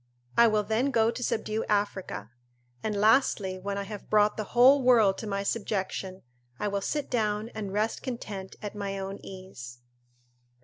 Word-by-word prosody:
"I 235 - +7
will 215 -1 +2
then 225 +6 +1
go 230 -3 +3
to 250 - -7
subdue 220 -2 -1
Africa; 200 - -2 0.5
and 210 -2 -2
lastly, 210 -4 +3
when 200 +1 -3
I 200 - -2
have 205 0 -8
brought 210 0 +4
the 215 - -3
whole 265 +3 +7
world 230 -6 +5
to 220 - -5
my 200 -1 -2
subjection, 195 -3 -3 0.4
I 210 - 0
will 200 0 -1
sit 295 +7 -2
down 215 -2 -1
and 215 -4 -5
rest 215 +3 -1
content 210 -7 -6
at 205 - -4
my 200 -1 -4
own 195 +1 -5
ease." 185 -11 -9
210 Hz, 170 wpm, -28 LUFS, 195-225 Hz, 0.5 s, I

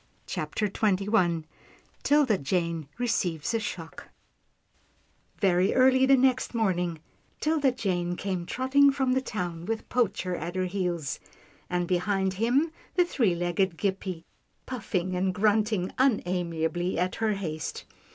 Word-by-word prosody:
CHAPTER 210 - -2
XXI 195 -4 +1 0.6
'tilda 280 -8 +3
jane 170 0 -1
receives 200 -6 -1
a 230 - +2
shock 175 -6 -6 1.3
Very 185 -1 +3
early 260 0 +5
the 270 0 +6
next 255 -1 +2
morning, 180 -7 0 0.4
'Tilda 300 -4 +2
Jane 175 -6 -1
came 185 -2 -3
trotting 275 +2 +4
from 265 -2 +1
the 260 - +2
town 175 -9 -4
with 225 +2 -3
Poacher 195 -6 0
at 170 +2 -5
her 185 0 0
heels, 180 -6 -2 0.5
and 175 -1 0
behind 190 +1 +1
him, 270 +8 +2 0.2
the 355 - +4
three 225 - +1
legged 175 +1 0
Gippie, 190 -3 -2 0.4
puffing 185 -7 -2
and 185 0 0
grunting 210 -2 +2
unamiably 175 -7 0
at 180 +2 0
her 220 -1 +2
haste. 160 -6 -4
190 Hz, 125 wpm, -27 LUFS, 175-235 Hz, 1.3 s, the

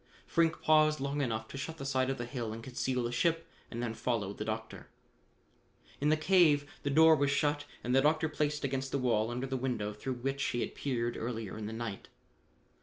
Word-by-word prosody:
Frink 165 -1 +1
paused 155 -1 +4
long 140 +2 -1
enough 110 -4 -2
to 135 - -6
shut 160 +3 -5
the 135 - -6
side 130 -1 +1
of 135 - -1
the 120 - -4
hill 120 -3 -4
and 115 +1 -8
conceal 125 0 -1
the 120 - -2
ship, 165 +5 +1 0.2
and 120 0 -4
then 115 -2 -2
followed 110 -4 -2
the - - -1
doctor. 110 +1 -5 1.1
In 145 - +2
the 155 - +4
cave 155 -3 +4
the 145 - -1
door 160 +3 +7
was 140 -1 +2
shut 145 0 +1 0.2
and 125 - -1
the 135 - +6
doctor 155 +2 +3
placed 150 -1 -1
against 135 0 -2
the - - +1
wall 115 -4 +1
under 125 +2 -3
the 135 0 -3
window 120 -5 -2
through 130 +5 -4
which 135 +3 -2
he 120 - -1
had - - -3
peered 120 -4 -2
earlier 115 -3 -4
in 105 -1 -5
the - - -5
night. 115 -3 -5
130 Hz, 215 wpm, -32 LUFS, 120-145 Hz, 1.1 s, door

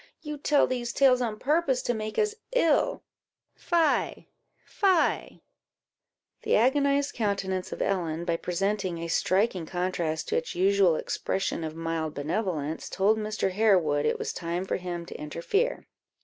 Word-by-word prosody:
You 300 -1 -5
tell 290 0 +3
these 240 -2 -3
tales 255 -2 +4
on 225 -3 -2
purpose 280 -1 +1
to 245 - 0
make 215 -1 -5
us 425 -1 +2 0.2
ill - - +2 0.5
fie! 330 -4 0 0.4
fie!" 375 -5 +1 1.0
The - - +1
agonized 280 +4 +2
countenance 195 -4 -2
of - - -2
Ellen, 170 -4 -1
by 170 -1 0
presenting 190 +1 -1
a 165 0 -4
striking 185 +1 +1
contrast 175 -3 -2
to - - +1
its 160 - -3
usual 190 -2 +4
expression 190 +1 -2
of 155 0 -5
mild 165 -1 -3
benevolence, 160 -1 -2
told 210 +3 +2
Mr. 215 -2 -1
Harewood 180 -8 +3
it - - +1
was - - -3
time 175 +2 -3
for - - -1
him 175 -2 -5
to - - -9
interfere. 285 - -1
195 Hz, 145 wpm, -27 LUFS, 170-255 Hz, 1.0 s, tales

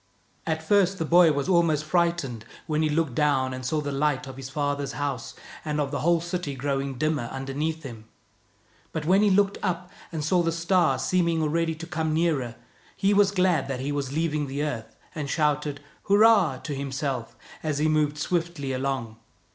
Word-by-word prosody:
At 160 0 -1
first 195 +2 +3
the 165 - -1
boy 170 0 +6
was 140 +1 -1
almost 165 -5 +3
frightened, 170 -8 0 0.2
when 155 -1 0
he 155 - +2
looked 155 -3 0
down 130 -2 +1
and 130 0 -6
saw 150 +4 0
the 145 -1 -3
lights 145 0 0
of 135 - -8
his 135 0 -7
father's 145 -1 -2
house 140 -5 -3 0.3
and 150 -1 -2
of 140 -2 -1
the 145 - -2
whole 170 +1 +3
city 175 -4 -4
growing 135 0 -2
dimmer 155 -2 0
underneath 145 +4 -3
him; 115 -5 -9 0.9
but 160 -2 -3
when 190 +4 +4
he 210 - +4
looked 200 +1 +2
up, 180 -2 -2 0.2
and 160 -3 -3
saw 175 +3 +3
the 165 -1 +1
star 170 -3 +2
seeming 170 +3 +1
already 165 +1 0
to 165 +1 -8
come 160 -2 -1
nearer, 150 -8 0 0.4
he 195 +1 +2
was 200 -1 +5
glad 180 -7 +2
that 135 -2 -3
he 135 +3 -2
was 140 -2 -2
leaving 150 -1 -1
the 140 +2 -2
earth, 120 -7 -4 0.2
and 150 -4 -4
shouted 150 -2 0
" - - -33
Hurrah! 200 -8 +5
" - - -21
to 145 - -4
himself, 135 -4 -3 0.3
as 155 -2 -1
he 150 +2 +2
moved 150 -1 +1
swiftly 165 -3 -2
along. 130 -4 -3
150 Hz, 195 wpm, -26 LUFS, 140-170 Hz, 0.9 s, boy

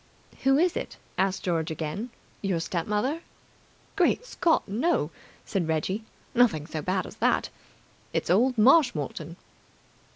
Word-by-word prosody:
"Who 270 +1 +4
is 350 +3 +3
it?" - - -4 0.2
asked 190 0 +1
George 165 -3 0
again. 160 +9 -4 0.3
"Your 190 -4 0
step 165 0 -2
mother?" 255 +10 0 0.7
"Great - - +2
Scott, 335 -9 +1
no!" 215 - +1 0.3
said 190 -6 -1
Reggie. 165 +7 -1 0.3
"Nothing 230 -12 +3
so 155 -1 -4
bad 185 +3 -1
as - - -10
that. - - +2 0.6
It's - - -1
old 245 +7 +3
Marshmoreton." 210 - +3
195 Hz, 130 wpm, -27 LUFS, 165-255 Hz, 0.7 s, Who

